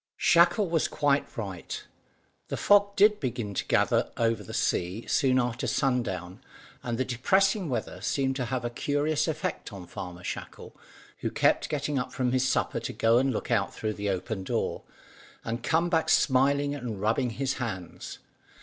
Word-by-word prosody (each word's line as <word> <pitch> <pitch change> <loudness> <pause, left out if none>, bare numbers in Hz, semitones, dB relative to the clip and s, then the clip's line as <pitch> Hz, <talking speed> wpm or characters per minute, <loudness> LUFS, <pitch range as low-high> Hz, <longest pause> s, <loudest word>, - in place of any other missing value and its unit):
Shackle 175 +4 +4
was 165 -2 +1
quite 145 -1 0
right; 95 -6 -5 0.6
the - - -3
fog 205 0 +4
did 210 +1 +5
begin 120 -6 -3
to - - -1
gather - - +2
over 115 -1 +1
the - - -9
sea 105 -2 -1
soon 130 -2 +2
after 120 -2 -1
sundown, 95 -9 -1 0.4
and 120 -1 -3
the 130 - 0
depressing 190 - +2
weather 125 - -3
seemed 135 -1 0
to 125 - -1
have 120 0 -3
a 120 - -2
curious 145 +5 0
effect 155 -6 -3
on 95 -3 -8
Farmer 90 0 -8
Shackle, - - -7 0.4
who - - -2
kept - - +2
getting 145 -1 -1
up 125 0 -4
from 125 -1 0
his 130 +1 +2
supper - - 0
to - - -5
go 115 +1 +4
and 135 +1 +1
look 115 - -4
out - - +1
through 110 0 -2
the 100 0 -3
open 95 +2 -3
door, - - -2 0.6
and 115 +1 -3
come 165 +7 +2
back 165 -2 +1
smiling 140 +1 +3
and 120 -8 -5
rubbing 115 +5 +1
his 135 +1 -1
hands. 95 -7 -5
125 Hz, 170 wpm, -28 LUFS, 115-145 Hz, 0.6 s, did